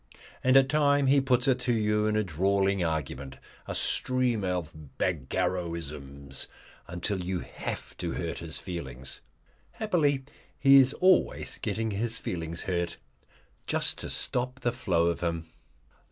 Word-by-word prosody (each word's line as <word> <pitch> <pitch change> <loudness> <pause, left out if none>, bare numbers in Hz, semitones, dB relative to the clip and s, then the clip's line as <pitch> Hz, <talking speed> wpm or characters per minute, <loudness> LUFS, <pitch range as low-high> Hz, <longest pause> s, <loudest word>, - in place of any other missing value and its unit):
And 130 +1 +6
at 135 -1 +6
times 145 -1 +3
he 140 -1 +5
puts 130 -1 +2
it 130 -1 +3
to 125 -1 +1
you 105 -1 +2
in 105 - +1
a 110 - +2
drawling 95 +2 +1
argument, 75 -4 -3 0.3
a - - -3
stream 125 -4 +2
of 90 -3 -2 0.3
Bagarrowisms, 75 -3 -3 0.4
until 90 +2 -3
you 90 0 -2
have - - -6
to 85 -2 -3
hurt 85 -1 -3
his 80 -2 -5
feelings 70 -8 -7 0.5
happily 155 -11 +1 0.3
he 135 0 +7
is 135 0 +6
always 185 0 +2
getting 110 0 -2
his 115 +3 -1
feelings 85 -1 -4
hurt 85 -2 -2 0.7
just - - +1
to - - -4
stop 125 +2 -2
the 120 - +1
flow 95 -9 +1
of 85 0 0
him. 85 -1 -2
95 Hz, 140 wpm, -28 LUFS, 85-130 Hz, 0.7 s, he